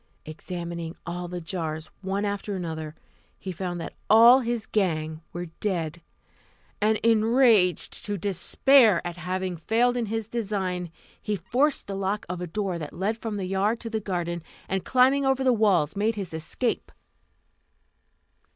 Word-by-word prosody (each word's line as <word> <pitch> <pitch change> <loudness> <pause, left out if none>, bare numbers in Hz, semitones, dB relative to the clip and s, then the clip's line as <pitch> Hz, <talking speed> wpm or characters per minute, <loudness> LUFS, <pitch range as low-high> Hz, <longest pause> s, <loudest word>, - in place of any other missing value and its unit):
Examining 170 +1 -6
all 175 +1 -4
the 180 0 -5
jars, 160 -2 -4
one 195 +1 -1
after 205 0 -3
another, 160 -3 -5 0.4
he 190 - -6
found 175 0 -4
that 165 - -6 0.2
all 235 +4 +8
his 235 -3 -2
gang 160 -6 -1
were 175 +1 -5
dead; 170 -5 -2 0.8
and, 215 +1 +3
enraged 225 - +3
to 205 -2 -2
despair 205 - +4
at 175 0 -5
having 185 +1 -3
failed 230 +9 +1
in 240 -2 -1
his 225 0 -3
design, 195 -6 -2 0.3
he 210 - -1
forced 250 - 0
the 200 - -5
lock 195 +2 -2
of 180 0 -4
a 180 - -3
door 190 -1 -2
that 150 -2 -6
led 200 +5 -1
from 225 -2 -5
the 195 - -3
yard 195 +5 0
to 230 - -7
the 220 - 0
garden, 175 -4 -3 0.3
and 190 -1 -1
climbing 265 +4 +4
over 265 0 +2
the 255 -1 +4
walls 195 -9 +2
made 215 +3 +1
his 195 -5 -5
escape. 165 +9 -2
195 Hz, 155 wpm, -26 LUFS, 175-225 Hz, 0.8 s, all